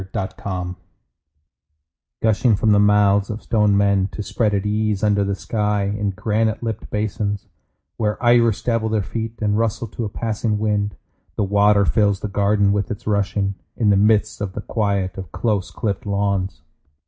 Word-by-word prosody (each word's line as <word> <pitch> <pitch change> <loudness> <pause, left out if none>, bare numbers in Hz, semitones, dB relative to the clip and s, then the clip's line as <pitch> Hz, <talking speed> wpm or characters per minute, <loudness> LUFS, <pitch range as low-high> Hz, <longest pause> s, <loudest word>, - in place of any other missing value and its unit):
In - - -14
a 95 - -1
Garden 90 -2 -4 1.5
Gushing 110 +1 +3
from 105 +2 +2
the 100 - +5
mouths 100 -1 +4
of 110 0 -5
stone 105 -3 +2
men 100 -1 +3
To 105 - -4
spread 105 0 0
at 100 0 -1
ease 105 -1 0
under 100 -1 +3
the 100 0 -1
sky 105 0 -1
In 105 -1 -1
granite 110 +3 -1
lipped 110 -2 -4
basins, 105 -1 -2 0.5
Where 105 -2 0
iris 120 -3 +4
dabble 115 -2 0
their 110 -2 0
feet 115 +3 -5
And 105 +1 +1
rustle 115 0 -1
to 115 - -5
a 105 - -2
passing 110 0 -2
wind, 105 -1 -1 0.4
The - - 0
water 100 +1 +4
fills 100 +5 +2
the 105 - -3
garden 100 0 +2
with 100 +2 -1
its 105 - -6
rushing, 100 -1 0 0.2
In 105 -3 +3
the - - +4
midst 105 +1 +2
of 100 -2 -3
the 105 - -5
quiet 100 -4 -1
of 95 -4 -8
close 100 -1 -1
clipped 100 -2 -3
lawns. 100 -5 -1
105 Hz, 175 wpm, -21 LUFS, 100-110 Hz, 1.5 s, the